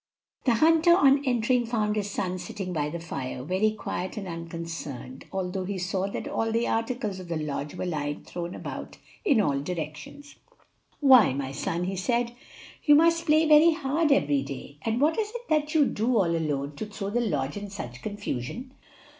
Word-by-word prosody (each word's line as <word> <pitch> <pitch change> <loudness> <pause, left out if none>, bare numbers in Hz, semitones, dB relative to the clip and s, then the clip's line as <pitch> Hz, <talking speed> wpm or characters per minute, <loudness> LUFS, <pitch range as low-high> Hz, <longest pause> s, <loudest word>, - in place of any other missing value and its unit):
The 240 -3 +4
hunter, 325 +5 +5
on 275 -4 +5
entering, 245 -1 +2
found 215 -3 0
his 205 -1 -1
son 185 -2 -2
sitting 185 0 -5
by 150 -2 -1
the 170 +3 -5
fire, 130 -6 -5
very 185 +8 +2
quiet 190 -3 -4
and 200 -3 -4
unconcerned, 165 -6 -6
although 190 0 -2
he 195 +1 -3
saw 190 +1 -1
that 200 - -5
all 225 0 -1
the 230 +1 +1
articles 225 -4 -1
of 185 - -9
the 170 -1 -2
lodge 150 0 -4
were 180 - -3
lying 150 -4 -3
thrown 175 0 -6
about - - -7 0.3
in 285 - +4
all 140 -9 +2
directions. 165 - -6 0.6
"Why, 260 - +7
my 135 -1 -3
son," 165 +5 -2
he 190 +2 -2
said, 235 +5 0 0.5
"you 295 -2 +7
must 335 +2 +4
play 310 +1 +5
very 310 +2 +7
hard 305 0 0
every 145 - +3
day; 140 +1 -8
and 225 +5 -1
what 310 +7 +2
is 425 -1 0
it 480 0 -7
that 305 0 +1
you 300 -3 +6
do, 235 0 +1
all 170 -5 +2
alone, 145 -3 -2
to 210 - -4
throw 200 -1 -5
the 240 +3 +1
lodge 145 - -1
in 205 0 -6
such 125 -11 -7
confusion?" 205 - -5
200 Hz, 190 wpm, -27 LUFS, 165-255 Hz, 0.6 s, Why